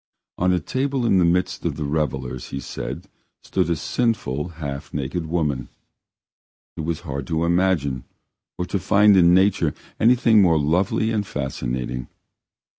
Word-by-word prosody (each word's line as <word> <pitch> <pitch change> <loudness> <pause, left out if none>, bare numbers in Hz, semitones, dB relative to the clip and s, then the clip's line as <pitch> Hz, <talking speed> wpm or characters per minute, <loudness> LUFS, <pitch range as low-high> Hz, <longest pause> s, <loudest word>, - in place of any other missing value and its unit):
On 90 +1 +3
a 90 - +2
table 130 - -1
in 95 -5 +4
the 90 - +4
midst 90 +2 0
of - - -1
the - - -4
revellers, 65 -4 -2
he 70 - -4
said, - - -6 0.4
stood - - 0
a 85 - +2
sinful, 85 - -1
half 70 -3 -5
naked 75 +4 -3
woman. 75 -7 -1 1.1
It - - -5
was 80 0 -3
hard 70 -1 -5
to 80 0 0
imagine 85 -7 +1 0.5
or 90 - -2
to 100 - -2
find 105 +2 +5
in 90 -1 +6
nature 95 -5 +2 0.2
anything 115 -2 +5
more 85 -4 +4
lovely 95 +9 +1
and 105 -2 0
fascinating. 65 -6 -4
85 Hz, 150 wpm, -22 LUFS, 70-95 Hz, 1.1 s, in